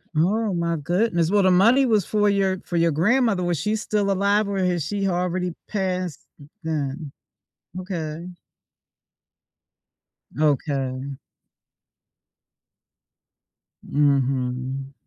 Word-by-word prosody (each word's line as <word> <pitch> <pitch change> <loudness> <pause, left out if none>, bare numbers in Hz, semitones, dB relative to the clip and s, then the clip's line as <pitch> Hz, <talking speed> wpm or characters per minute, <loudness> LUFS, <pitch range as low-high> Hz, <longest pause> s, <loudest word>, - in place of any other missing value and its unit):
Oh 200 +6 +1
my 170 -1 0
goodness. 175 +2 0
Well, 205 -1 +4
the 185 - +4
money 230 +9 +5
was 215 -5 +2
for 210 -1 +1
your 195 -2 +1
for 175 - -5
your 170 0 +3
grandmother. 205 - +2
Was 175 -3 0
she 210 +5 0
still 210 -2 0
alive 200 +2 +2
or 200 - -2
has 180 -3 0
she 200 +3 -1
already 180 -1 -1 0.2
passed 185 -5 -3 0.4
then? 150 -1 -3 0.7
Okay. 170 -2 -5 2.1
Okay. 140 -2 -1 2.7
Mhm. 135 -1 0
180 Hz, 100 wpm, -23 LUFS, 150-200 Hz, 2.7 s, money